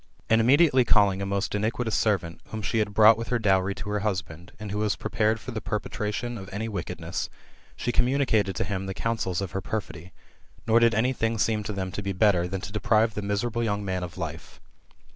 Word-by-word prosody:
And 115 0 +5
immedi 135 +7 +5
ately 130 -1 +4
calling 100 -3 +4
a 100 - -2
most 100 +1 -1
iniquitous 110 +2 -1
servant, 90 -6 0
whom 110 -1 -6
she 110 +3 0
had 105 -1 0
brought 110 +1 +7
with 115 - -4
her 125 - +1
dowry 95 -3 +2
to - - -7
her 105 - 0
husbland, 90 -5 -4
and 105 -2 -6
who 105 - -2
was 105 -1 +1
prepared 110 +1 0
for 130 - -7
the 110 -2 -4
perpetration 105 +3 -3
of 95 0 -9
any 105 +3 -3
wickedness, 100 -6 -4 0.5
she 120 - -2
communicated 120 -7 +2
to - - 0
him 95 -1 -3
the 95 - -4
counsels 110 -6 -1
of 95 -2 -4
her 95 - -3
perfidy; 95 -5 -5 0.5
nor 115 0 +5
did 115 -2 +4
any 125 +4 +2
thing 115 -2 -1
seem 110 0 +1
to 105 - -3
them 95 -2 -3
to 105 - -4
be 100 -1 -3
better, 95 -3 +3
than 95 +1 -4
to 100 - -7
deprive 110 +1 +2
the 105 - -3
miserable 105 +4 -1
young 105 -2 -1
man 95 -1 -2
of 90 0 -7
life. 80 -2 -6
105 Hz, 220 wpm, -26 LUFS, 95-115 Hz, 0.5 s, brought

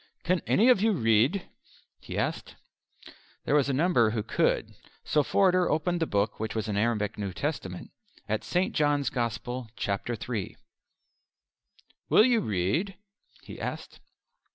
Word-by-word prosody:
"Can 180 0 +1
any 225 - +4
of 245 -6 +5
you 220 0 +3
read?" 115 - +2 0.5
he - - -7
asked. - - -3 0.9
There - - 0
were 145 -1 +5
a - - 0
number 135 -5 +3
who 110 -1 -2
could; - - 0 0.3
so 150 - +2
Forder 185 +3 +2
opened 170 +3 0
the 165 - 0
book 100 +1 -1
which 110 +1 -4
was 110 -1 -2
an 105 - -2
Arabic 105 -1 0
New 100 -2 -3
Testament 95 - -4 0.4
at 110 0 -1
St. 180 +1 0
John's 145 -4 +1
Gospel, 120 0 -3
Chapter 105 +4 -2
III. 110 -6 -4 1.5
"Will 215 - +6
you 245 -3 +3
read?" 105 - -1 0.5
he - - -10
asked. - - -6
125 Hz, 145 wpm, -28 LUFS, 110-175 Hz, 1.5 s, Will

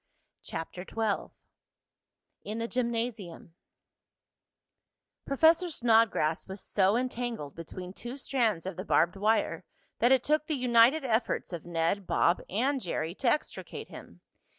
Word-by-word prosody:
CHAPTER 180 +2 -6
XII 220 0 -2 1.1
IN 210 +2 -5
THE 230 0 -2
GYMNASIUM 230 -9 -3 1.7
Professor 320 +5 +4
Snodgrass 225 - +2
was 190 +1 -7
so 195 +3 +2
entangled 240 - -3
between 180 +2 -8
two 240 +5 -7
strands 230 -11 0
of 190 -2 -5
the 185 - -4
barbed 170 -2 +2
wire 215 +3 +1 0.4
that 240 - +4
it 260 -2 +4
took 305 0 +1
the 310 - 0
united 250 +3 +4
efforts 225 -5 -1
of 170 0 -6
Ned, 170 +3 -1
Bob 170 - +2
and 260 +7 0
Jerry 165 -2 -3
to 240 +5 0
extricate 300 - -3
him. - - -12
225 Hz, 130 wpm, -29 LUFS, 185-250 Hz, 1.7 s, Professor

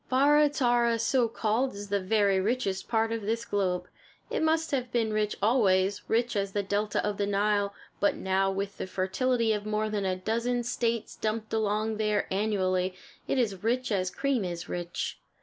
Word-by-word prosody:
Barra 290 +3 +5
Tarra, 240 -4 +2
so 240 +1 +2
called, 230 +2 0
is 205 0 -7
the 200 0 +1
very 200 0 +2
richest 195 -2 -1
part 225 -1 +1
of 230 -1 -2
this 225 +3 -2
globe. 180 -3 -1 0.4
It - - 0
must 320 0 +1
have 255 -3 -1
been 225 -3 0
rich 210 -1 0
always, 200 -4 +3
rich 235 +1 +1
as 200 -1 -1
the 205 - 0
delta 205 +1 -1
of 205 -1 -2
the 200 - 0
Nile; 205 0 +1 0.2
but 200 - +2
now, 190 0 +1
with 195 +1 -3
the - - -3
fertility 225 +5 +1
of 210 0 -3
more 215 0 -1
than 205 -2 -1
a 185 -1 +1
dozen 235 +5 -1
States 235 -1 -1
dumped 220 0 -3
along 215 0 0
there 210 -1 +1
annually, 185 -2 0 0.3
it - - 0
is 205 -7 0
rich 245 +2 0
as 185 -3 +1
cream 270 -1 0
is 175 -2 -4
rich. 175 0 -4
215 Hz, 185 wpm, -28 LUFS, 195-235 Hz, 0.4 s, Barra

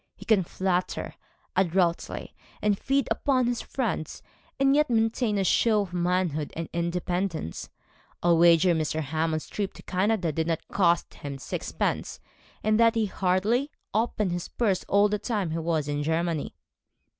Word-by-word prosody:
He - - -13
can 210 -4 +4
flatter 180 +1 -2 0.4
adroitly, 175 -2 0 0.3
and 210 -1 +2
feed 275 +5 0
upon 255 +2 +2
his 240 0 -1
friends, 230 - -3 0.4
and 275 0 +4
yet 300 -1 +3
maintain 225 -1 +1
a 195 - +2
show 215 +2 +3
of 180 -3 -10
manhood 175 -4 0
and 165 0 -4
independence. 170 - -2 0.5
I'll 170 -1 +4
wager 170 +1 +6
Mr. 160 -1 -1
Hammond's 155 +2 -1
trip 200 -2 -3
to - - -13
Canada 190 -2 0
did 160 +2 -1
not 165 -2 -2
cost 170 -3 +2
him 140 -1 -7
sixpence, 135 - -3 0.4
and 215 +1 +2
that 230 0 +5
he 225 -1 +2
hardly 200 +8 +1 0.2
opened 215 -3 0
his 175 0 -3
purse 205 -6 0
all 200 +1 +4
the 210 0 -1
time 205 -8 -2
he 165 - -2
was 160 -3 -1
in 145 0 -1
Germany.' 160 0 -1
185 Hz, 155 wpm, -27 LUFS, 165-215 Hz, 0.5 s, wager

